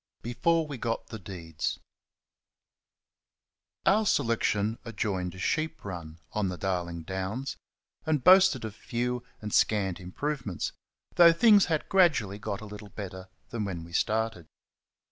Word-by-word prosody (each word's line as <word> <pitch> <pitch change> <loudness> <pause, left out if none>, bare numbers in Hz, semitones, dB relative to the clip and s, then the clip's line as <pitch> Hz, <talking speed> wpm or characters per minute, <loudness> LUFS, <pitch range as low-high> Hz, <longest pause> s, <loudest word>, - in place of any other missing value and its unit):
Before 165 - +1
We 145 -4 -7
Got 115 0 -2
The 110 - -7
Deeds 85 -5 -4 2.1
Our 210 +3 +5
selection 115 - +1
adjoined 100 -5 -2
a - - -10
sheep 160 +9 -1
run 85 -4 -6
on 105 -3 0
the 90 - -4
Darling 85 -3 -2
Downs, 95 +9 -3 0.5
and 150 -5 0
boasted 185 -10 +6
of 110 - -5
few 120 +2 -3 0.2
and 105 -1 -5
scant 95 -4 +2
improvements, 105 - -3 0.5
though 170 -1 +9
things 205 +3 +6
had 160 -3 -1
gradually 150 - +3
got 100 -1 -4
a - - -7
little 105 0 -9
better 95 -2 -8 0.2
than 115 -3 -2
when 90 -5 -4
we 85 +1 -12
started. 110 -3 0
110 Hz, 135 wpm, -29 LUFS, 95-140 Hz, 2.1 s, though